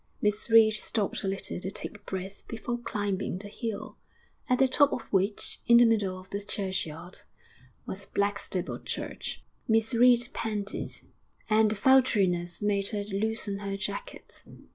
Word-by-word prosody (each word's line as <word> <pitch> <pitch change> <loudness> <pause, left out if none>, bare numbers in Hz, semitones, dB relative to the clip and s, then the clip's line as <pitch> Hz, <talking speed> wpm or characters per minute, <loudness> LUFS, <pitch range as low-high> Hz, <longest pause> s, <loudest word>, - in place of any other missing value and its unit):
Miss 210 +1 +1
Reed 225 -1 +7
stopped 210 -1 -1
a - - -1
little 195 -2 -3
to 185 - -4
take 205 +1 -4
breath 190 +1 -5
before 240 +1 -4
climbing 205 -5 -2
the 205 +2 -7
hill, 225 -1 -5 0.5
at 250 - +4
the 265 - +5
top 285 +2 +4
of - - -2
which, 195 +2 0
in 235 - +8
the 240 - +8
middle 205 -5 +1
of 185 - -15
the 200 - -2
churchyard, 185 -4 -4 0.7
was 195 +1 -5
Blackstable 200 -2 -2
Church. - - -5 0.2
Miss 225 +1 +2
Reed 245 +1 +5
panted, 210 -2 -3 0.6
and 215 0 +5
the 215 - 0
sultriness 195 -8 +3
made 200 -1 +1
her 205 -2 -2
loosen 205 0 -2
her 200 -1 -3
jacket. - - -6
205 Hz, 150 wpm, -28 LUFS, 195-225 Hz, 0.7 s, in